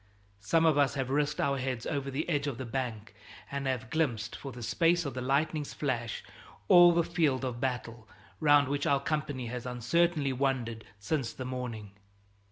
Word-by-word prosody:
Some 160 +12 +2
of 155 -3 +4
us 140 0 +3
have 135 -1 -2
risked 150 +1 0
our 140 -1 +1
heads 130 -3 -3
over 140 -2 -2
the 135 +4 -3
edge 145 -4 0
of 135 -5 -3
the 130 - -5
bank 115 -4 -4 0.4
and 140 -1 -3
have 130 0 -2
glimpsed 130 -10 -1
for 135 - -7
the 120 -1 -8
space 170 +6 +2
of 140 - -3
the 125 - -4
lightning's 145 +3 0
flash 120 -6 -2 0.4
all 175 -1 +8
the 170 0 +3
field 150 -6 +1
of 120 -2 -4
battle 120 -4 -3 0.3
round 145 -3 +5
which 140 +1 -1
our 140 -1 +3
company 145 -3 -2
has 125 +1 -5
uncertainly 140 +4 +1
wandered 125 -4 -1
since 120 +3 -1
the 130 - -6
morning. 125 -5 -5
135 Hz, 180 wpm, -30 LUFS, 125-150 Hz, 0.4 s, all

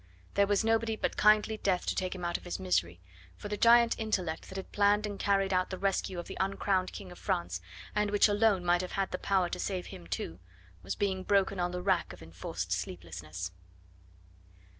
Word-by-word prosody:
There 200 0 +3
was 205 +1 +2
nobody 225 0 +2
but - - -2
kindly 215 +1 +4
Death 190 -4 0
to - - 0
take 185 0 -2
him 180 -2 -5
out 175 0 -1
of - - -3
his 175 - -4
misery, 85 -1 0 0.4
for 205 - -7
the 210 - -1
giant 235 +1 +5
intellect 185 -7 -2
that 190 - -9
had 190 - -6
planned 205 +1 +3
and 205 -1 -5
carried 195 -1 +2
out 185 0 +1
the 185 - -4
rescue 195 -1 -1
of 175 - -4
the - - -7
uncrowned 190 -1 0
King 185 -2 -8
of 180 - -12
France, 90 +1 -2 0.3
and 210 0 +1
which 205 +1 +5
alone 205 -3 +2
might 175 0 +3
have 185 - -6
had 195 -1 -1
the - - -3
power 190 -2 +2
to - - -4
save 185 -3 -2
him 85 - -10
too, 90 -1 -4 0.4
was 95 +2 -4
being 190 -2 0
broken 195 0 +2
on 175 0 +1
the 180 0 -4
rack 190 - +1
of 90 - -12
enforced 80 +2 -5
sleeplessness. 85 0 -4
190 Hz, 210 wpm, -31 LUFS, 175-205 Hz, 0.4 s, giant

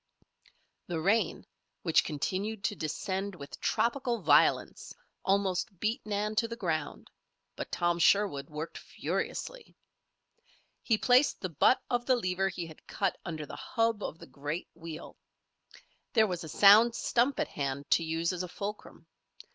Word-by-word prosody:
The 170 -2 -2
rain, 200 +8 +1 0.4
which 165 -3 +4
continued 195 +8 -3
to 205 - 0
descend 190 +5 -3
with 140 -4 -10
tropical 240 -1 0
violence, - - +3 0.3
almost 190 -1 0
beat 220 +2 -1
Nan 210 +1 -1
to 230 0 +3
the 230 - -5
ground; 165 -9 -3 0.4
but - - -6
Tom 175 0 +1
Sherwood 170 -6 +3
worked 155 +2 -6
furiously. - - -4 1.1
He 225 - +2
placed 250 +5 +4
the 185 - -3
butt 165 - +4
of 245 -1 -1
the 260 - +5
lever 195 -4 0
he 175 -2 -5
had 160 -1 -14
cut 195 -2 -1
under 155 -3 -4
the - - -9
hub 225 -2 0
of 160 - -4
the - - -12
great 145 +5 -5
wheel. 165 -1 -9 1.0
There 220 -4 +5
was 180 -4 -3
a 160 - -7
sound 215 +7 +7
stump 250 +4 +1
at - - 0
hand 140 0 -3
to 165 - +4
use 165 +2 -1
as 180 - -3
a 180 - -4
fulcrum. 205 +3 -7
190 Hz, 150 wpm, -30 LUFS, 165-220 Hz, 1.1 s, sound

